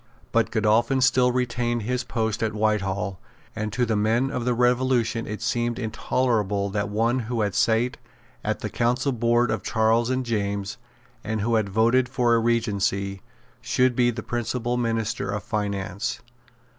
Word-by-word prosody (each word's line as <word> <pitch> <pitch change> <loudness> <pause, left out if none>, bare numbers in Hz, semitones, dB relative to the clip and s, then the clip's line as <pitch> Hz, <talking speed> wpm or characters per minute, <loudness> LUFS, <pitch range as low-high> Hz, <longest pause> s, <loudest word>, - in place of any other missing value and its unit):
But 115 -1 +2
Godolphin 110 +4 +2
still 125 -1 +4
retained 120 -2 -1
his 125 +3 -1
post 110 -2 -2
at 110 -1 -1
Whitehall; 100 -3 0 0.4
and 110 0 -3
to 125 +3 +1
the 110 -1 0
men 115 +6 +1
of 125 -3 -3
the 125 -1 +1
Revolution 125 -2 +1
it 105 +1 -5
seemed 120 0 0
intolerable 110 -4 0
that 100 0 -1
one 115 +4 +1
who 115 -1 -2
had 100 -2 0
sate 115 +5 +2 0.5
at - - -2
the - - -3
Council 120 +4 +1
Board 120 0 +2
of 110 - -1
Charles 115 +1 +2
and 130 0 -1
James, 100 -2 -2 0.4
and 110 -1 -2
who 115 +3 0
had 110 -3 +1
voted 115 +5 +3
for 125 -2 +2
a 115 - +4
Regency, 100 -4 0 0.4
should 125 +2 +2
be 120 0 +3
the 115 -2 -4
principal 120 0 -2
minister 115 -4 -1
of 100 0 -3
finance. 100 -1 -3
115 Hz, 160 wpm, -24 LUFS, 105-120 Hz, 0.5 s, still